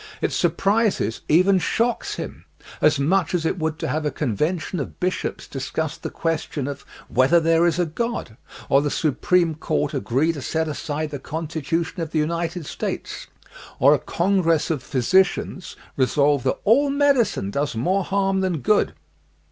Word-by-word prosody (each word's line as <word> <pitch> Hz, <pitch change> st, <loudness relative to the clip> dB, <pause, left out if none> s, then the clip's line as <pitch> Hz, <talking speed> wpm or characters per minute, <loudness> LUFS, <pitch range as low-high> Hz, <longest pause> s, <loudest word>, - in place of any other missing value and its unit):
It -, -, -1 dB
sur -, -, +2 dB
prises, 200 Hz, -, 0 dB
even 185 Hz, +4 st, +5 dB
shocks, 235 Hz, +6 st, 0 dB
him, -, -, -7 dB, 0.4 s
as 150 Hz, 0 st, +4 dB
much 180 Hz, +6 st, +1 dB
as 165 Hz, -2 st, -1 dB
it 180 Hz, -, -1 dB
would 160 Hz, 0 st, -1 dB
to -, -, -3 dB
have 150 Hz, +3 st, -1 dB
a 150 Hz, -, +1 dB
convention 155 Hz, -, -2 dB
of 140 Hz, -, -6 dB
bishops 185 Hz, +1 st, -2 dB
discuss 145 Hz, +3 st, -3 dB
the 165 Hz, -, -6 dB
question 160 Hz, -4 st, -2 dB
of 140 Hz, -1 st, -6 dB, 0.2 s
whether 130 Hz, +8 st, +4 dB
there 165 Hz, +1 st, +3 dB
is 170 Hz, -1 st, +1 dB
a 175 Hz, -, +2 dB
God, 200 Hz, -, -4 dB, 0.3 s
or 140 Hz, -, +4 dB
the 145 Hz, -, 0 dB
Supreme 165 Hz, +4 st, +1 dB
Court 155 Hz, 0 st, -2 dB
agree 135 Hz, +4 st, +1 dB
to 145 Hz, -, -7 dB
set 160 Hz, +5 st, -1 dB
aside 150 Hz, 0 st, -3 dB
the 145 Hz, -, -5 dB
Constitution 160 Hz, +2 st, -3 dB
of 165 Hz, -, -3 dB
the 160 Hz, -, -2 dB
United 170 Hz, +2 st, -1 dB
States, -, -, -5 dB, 0.5 s
or 140 Hz, +3 st, +6 dB
a 145 Hz, -, +2 dB
con 190 Hz, +8 st, +1 dB
gress 165 Hz, -2 st, +1 dB
of 150 Hz, -5 st, -1 dB
physicians 185 Hz, +8 st, +1 dB, 0.2 s
resolve 140 Hz, +1 st, +2 dB
that 130 Hz, -, +1 dB
all 275 Hz, +7 st, +4 dB
medicine 275 Hz, -, +2 dB
does 140 Hz, +3 st, -1 dB
more 185 Hz, -, +1 dB
harm 195 Hz, 0 st, 0 dB
than 180 Hz, -6 st, -1 dB
good. 210 Hz, -, +2 dB
160 Hz, 170 wpm, -23 LUFS, 145-185 Hz, 0.5 s, or